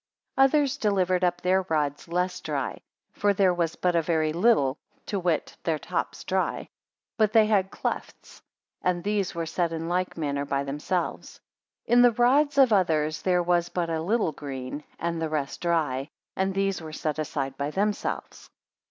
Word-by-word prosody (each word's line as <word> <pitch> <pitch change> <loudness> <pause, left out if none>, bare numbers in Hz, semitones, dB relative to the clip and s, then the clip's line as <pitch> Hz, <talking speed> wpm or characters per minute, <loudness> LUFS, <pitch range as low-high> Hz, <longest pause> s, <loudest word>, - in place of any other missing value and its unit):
9 270 - +6
Others 285 -1 +2
delivered 185 -3 +1
up 175 -1 +1
their 185 +1 +3
rods 150 -2 -1
less 180 +2 -1
dry - - -3 0.3
(for 205 -1 +1
there 185 -2 +4
was 170 -2 -1
but 180 -1 0
a 170 - +4
very 155 -1 0
little, 170 - +3 0.3
to 200 - -2
wit, 175 -4 -1
their 160 -2 0
tops - - -3
dry), - - -1 0.5
but 215 -2 +2
they 220 -2 +6
had 200 -3 +2
clefts, - - -5 0.4
and 175 -1 0
these 200 -2 -1
were 165 -1 -2
set 170 +1 -1
in 165 0 -4
like 180 +1 -1
manner 140 -3 -1
by 140 -1 -1
themselves. 150 +6 -3 0.5
In 245 +1 +5
the 245 -1 +6
rods 280 +5 +3
of 260 -5 +6
others 155 -5 +1
there 180 -1 +2
was 175 0 +1
but 170 -2 -2
a 160 -1 -1
little 205 0 +1
green, 140 0 -6
and 170 0 -2
the 160 - -1
rest 150 -3 -3
dry; 155 -5 0 0.3
and 190 0 0
these 195 -2 0
were 160 -1 -8
set 155 -1 -2
aside 135 -3 -3
by 140 +1 -2
themselves. 205 +6 -3
175 Hz, 175 wpm, -26 LUFS, 155-195 Hz, 0.5 s, 9